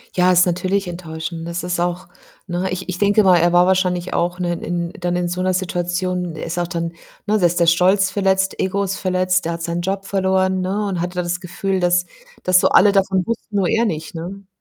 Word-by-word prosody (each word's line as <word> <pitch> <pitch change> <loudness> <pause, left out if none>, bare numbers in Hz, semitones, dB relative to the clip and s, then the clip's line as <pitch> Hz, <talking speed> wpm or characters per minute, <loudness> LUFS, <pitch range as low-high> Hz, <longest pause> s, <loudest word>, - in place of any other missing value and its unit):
Ja, 180 0 +4
ist 180 0 +5
natürlich 185 +2 -1
enttäuschend. 165 -1 -6
Das 170 0 -4
ist 175 -1 -2
auch 175 +1 -2 0.4
ne? 180 +1 -2
Ich 185 +1 -4
ich 180 - -3
denke 205 +2 +3
mal, 185 -2 +6
er 170 +1 +3
war 175 0 +6
wahrscheinlich 185 -1 0
auch, 175 +1 -1
ne, 175 -1 -1
in 170 0 -3
dann 175 0 -1
in 180 0 0
so 180 +1 -3
'ner 185 0 +1
Situation 180 -1 -2
er 155 - -6
ist 170 +1 -4
auch 175 - -1
dann 170 -1 -3 0.4
ne? 215 +1 +2
Da 180 - +3
ist 175 +1 +2
der 170 - +4
Stolz 190 +3 +4
verletzt, 190 -1 +1
Ego 200 +2 0
ist 195 0 -2
verletzt, 185 -1 0
der 170 - -1
hat 165 - -6
seinen 170 +1 -2
Job 195 +2 -3
verloren, 190 -1 +1
ne, 195 +3 -1
und 180 -3 -2
hat 180 +1 -4
ja 180 - -1
das 175 0 -2
Gefühl, 190 +1 -2
dass 175 0 +2 0.4
dass 185 0 +5
so - - +3
alle 205 +1 +6
davon 190 -2 +2
wussten, 230 -2 -5
nur 195 -3 +2
er 230 +1 +2
nicht, 160 -5 -4
ne? 190 +4 -7
180 Hz, 235 wpm, -20 LUFS, 175-190 Hz, 0.4 s, mal